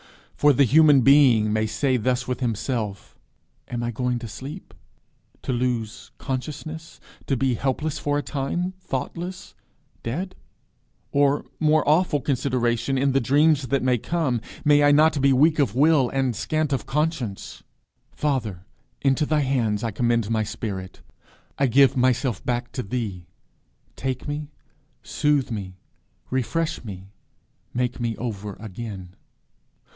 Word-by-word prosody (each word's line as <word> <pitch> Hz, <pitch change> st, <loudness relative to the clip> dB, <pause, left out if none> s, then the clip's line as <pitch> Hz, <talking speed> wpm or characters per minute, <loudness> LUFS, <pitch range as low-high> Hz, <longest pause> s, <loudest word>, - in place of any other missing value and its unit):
For 145 Hz, -, +5 dB
the 140 Hz, -, +4 dB
Human 145 Hz, +1 st, +6 dB
Being 125 Hz, -6 st, +5 dB
may 110 Hz, 0 st, +1 dB
say 130 Hz, +5 st, +1 dB
thus 125 Hz, +2 st, 0 dB
with 125 Hz, -1 st, -2 dB
himself: 115 Hz, -4 st, -3 dB, 0.5 s
"Am 120 Hz, -1 st, -4 dB
I 120 Hz, -, -1 dB
going 125 Hz, +2 st, -1 dB
to 120 Hz, -1 st, -6 dB
sleep 145 Hz, -, -9 dB, 0.7 s
to 130 Hz, -, -1 dB
lose 120 Hz, -2 st, -2 dB
consciousness 155 Hz, +4 st, -6 dB, 0.3 s
to 135 Hz, -, +1 dB
be 130 Hz, 0 st, +1 dB
helpless 140 Hz, +5 st, -2 dB
for 145 Hz, 0 st, 0 dB
a 145 Hz, -, -1 dB
time 160 Hz, +7 st, -2 dB
thoughtless 180 Hz, 0 st, -5 dB, 0.5 s
dead? 180 Hz, +11 st, -4 dB, 0.8 s
Or, 140 Hz, 0 st, +2 dB
more 155 Hz, -1 st, +3 dB
awful 155 Hz, 0 st, +3 dB
consideration, 130 Hz, -1 st, 0 dB
in 135 Hz, +1 st, +2 dB
the 135 Hz, +1 st, +2 dB
dreams 145 Hz, +2 st, +3 dB
that 135 Hz, +2 st, 0 dB
may 125 Hz, -2 st, +2 dB
come 145 Hz, -6 st, -1 dB, 0.2 s
may 145 Hz, 0 st, +5 dB
I 145 Hz, -, +6 dB
not 150 Hz, 0 st, +4 dB
be 140 Hz, 0 st, +4 dB
weak 150 Hz, +4 st, +4 dB
of 120 Hz, -7 st, +1 dB
will 145 Hz, -2 st, +4 dB
and 135 Hz, -3 st, 0 dB
scant 155 Hz, +6 st, -1 dB
of 135 Hz, -, -2 dB
conscience? 150 Hz, -9 st, -2 dB, 0.5 s
Father, 110 Hz, -11 st, -2 dB, 0.4 s
into 135 Hz, +2 st, +2 dB
thy 155 Hz, -1 st, +2 dB
hands 120 Hz, -6 st, 0 dB
I 115 Hz, -, -1 dB
commend 115 Hz, 0 st, 0 dB
my 110 Hz, -1 st, +2 dB
spirit. 100 Hz, -3 st, -5 dB, 0.6 s
I 140 Hz, -, +4 dB
give 135 Hz, +2 st, +5 dB
myself 125 Hz, -4 st, +1 dB
back 120 Hz, 0 st, -2 dB
to 130 Hz, -, -3 dB
thee. 100 Hz, -6 st, -4 dB, 0.7 s
Take 130 Hz, +1 st, -4 dB
me, 145 Hz, 0 st, -4 dB, 0.5 s
soothe 145 Hz, -4 st, +1 dB
me, 95 Hz, -4 st, -5 dB, 0.6 s
refresh 155 Hz, +6 st, -1 dB
me, 95 Hz, -3 st, -9 dB, 0.6 s
'make 125 Hz, 0 st, -1 dB
me 115 Hz, -2 st, -1 dB
over 105 Hz, -4 st, -5 dB
again.' 100 Hz, -3 st, -8 dB
130 Hz, 140 wpm, -24 LUFS, 115-145 Hz, 0.8 s, Human